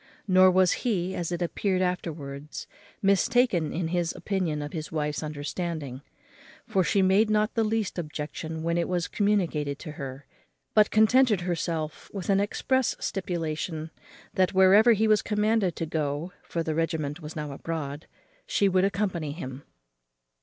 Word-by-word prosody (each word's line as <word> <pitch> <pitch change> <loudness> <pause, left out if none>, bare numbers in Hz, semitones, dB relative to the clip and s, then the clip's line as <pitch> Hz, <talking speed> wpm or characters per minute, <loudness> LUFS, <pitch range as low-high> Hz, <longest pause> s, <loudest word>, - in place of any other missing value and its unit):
Nor 185 -1 +7
was 185 -1 +4
he, 190 -7 0
as 175 0 -3
it 175 0 -1
appeared 185 +2 0
afterwards, 150 -5 -4 0.4
mistaken 200 -3 +3
in 165 -1 -2
his 175 -1 -1
opinion 175 -7 -2
of 145 - -7
his 155 -3 -5
wife's 150 -2 -2
understanding; 150 -2 -4 0.6
for 195 -5 +1
she 195 +2 +2
made 195 +4 +4
not 215 +1 +2
the 225 - +2
least 215 -4 -1
objection 160 0 -5
when 170 +1 +1
it 170 - 0
was 175 -2 -1
communicated 170 -9 0
to 155 - -8
her, 140 -2 -7 0.5
but 210 -1 +5
contented 220 -1 +4
herself 165 -3 -3
with 195 0 -1
an 195 - +4
express 260 +5 +1
stipulation, 165 -3 -3 0.4
that 185 0 +1
wherever 200 +5 +7
he 220 +1 +2
was 215 -1 +4
commanded 210 -3 +1
to 165 - -2
go 155 +2 -2
(for 170 - -3
the 160 - -2
regiment 160 -1 -2
was 150 0 -8
now 150 -2 -4
abroad) 145 0 -5 0.4
she 200 - +2
would 185 -1 +3
accompany 185 -6 -1
him. 135 -5 -7
175 Hz, 155 wpm, -27 LUFS, 155-195 Hz, 0.6 s, Nor